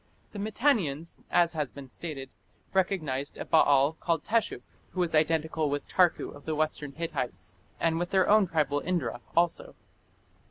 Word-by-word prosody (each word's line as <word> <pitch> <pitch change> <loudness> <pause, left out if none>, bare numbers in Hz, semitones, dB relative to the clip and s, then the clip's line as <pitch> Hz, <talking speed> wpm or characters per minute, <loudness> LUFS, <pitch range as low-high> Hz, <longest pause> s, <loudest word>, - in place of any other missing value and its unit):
The 205 - -7
Mitannians, 200 - 0
as 170 -1 +3
has 150 -4 -2
been 140 +1 -10
stated, 135 -1 -7 0.4
recognized 155 -8 0
a - - -5
Baal 145 -2 +4
called 165 -3 0
Teshup, 225 0 0 0.3
who 185 - -4
was 175 -2 +1
identical 160 0 +1
with 145 0 -3
Tarku 180 -2 +2
of 145 - -14
the 160 - -1
Western 150 -2 -2
Hittites 140 - -4 0.2
and 165 -1 +1
with 175 0 -2
their 190 -1 +3
own 210 -2 +5
tribal 145 -4 +1
Indra 135 -9 -2 0.2
also. 170 0 +1
160 Hz, 155 wpm, -29 LUFS, 145-180 Hz, 0.4 s, own